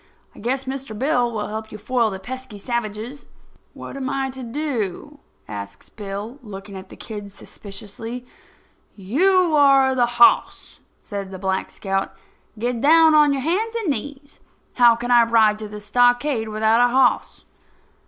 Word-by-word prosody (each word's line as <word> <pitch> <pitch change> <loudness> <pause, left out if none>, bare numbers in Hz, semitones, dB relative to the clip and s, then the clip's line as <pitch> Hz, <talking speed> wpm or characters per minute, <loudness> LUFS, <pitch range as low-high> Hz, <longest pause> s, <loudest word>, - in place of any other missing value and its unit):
I - - -15
guess 260 +4 -1
Mr. 265 -4 -6
Bill 245 -2 +1
will 215 -2 -3
help 220 +1 -6
you 215 - -7
foil 230 +2 0
the 190 - -5
pesky 255 +2 -8
savages." 235 +4 -5 0.5
"What - - -9
am 265 -1 -4
I 270 -1 -2
to 260 0 -9
do?" 270 - -4 0.3
asks 100 -1 -8
Bill, 210 +5 -7
looking 200 -3 -10
at 190 0 -10
the - - -12
kid 205 -2 -8
suspiciously. 220 +5 -9 0.7
"You 335 - +2
are 275 -2 +5
the 245 -2 +2
hoss," 235 - +3 0.2
says 200 -2 -6
Black 190 0 -2
Scout. 195 -1 -3 0.4
"Get 235 +1 -2
down 320 +2 +6
on 300 -1 +5
your 275 -2 -1
hands 425 +9 -1
and 435 -9 0
knees. 285 +3 -6 0.3
How 240 -2 +6
can 240 +1 -4
I 240 -1 +7
ride 220 -2 +3
to 215 - -6
the 210 0 -8
stockade 245 +2 +2
without 220 +2 +2
a 245 0 +4
hoss?" 255 -1 +1
240 Hz, 155 wpm, -22 LUFS, 210-270 Hz, 0.7 s, I